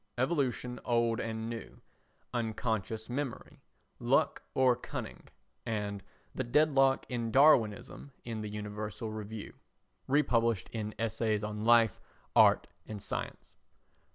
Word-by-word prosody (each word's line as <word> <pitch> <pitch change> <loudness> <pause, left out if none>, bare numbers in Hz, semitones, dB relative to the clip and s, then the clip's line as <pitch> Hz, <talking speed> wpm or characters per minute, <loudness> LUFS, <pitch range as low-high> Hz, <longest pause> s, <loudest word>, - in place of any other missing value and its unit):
[Evolution 125 -3 0
Old 115 -1 +1
and 110 0 -3
New, 115 -1 -7 0.5
Unconscious 110 -2 -2
Memory, 130 0 -5 0.4
Luck - - +2
or 130 -2 +5
Cunning? 125 - -7 0.4
and 105 -2 -3 0.3
"The 130 - -2
Deadlock 135 +1 +3
in 120 -3 -2
Darwinism" 130 -1 +3
in 115 -2 -4
the 105 - -4
Universal 105 +1 -5
Review 110 0 -6 0.5
republished 115 -7 +2
in 110 -2 -4
Essays 110 -1 0
on 105 0 -4
Life, 115 -3 +5 0.4
Art - - +6 0.2
and 105 -1 -6
Science. - - -6
115 Hz, 110 wpm, -32 LUFS, 110-125 Hz, 0.5 s, Art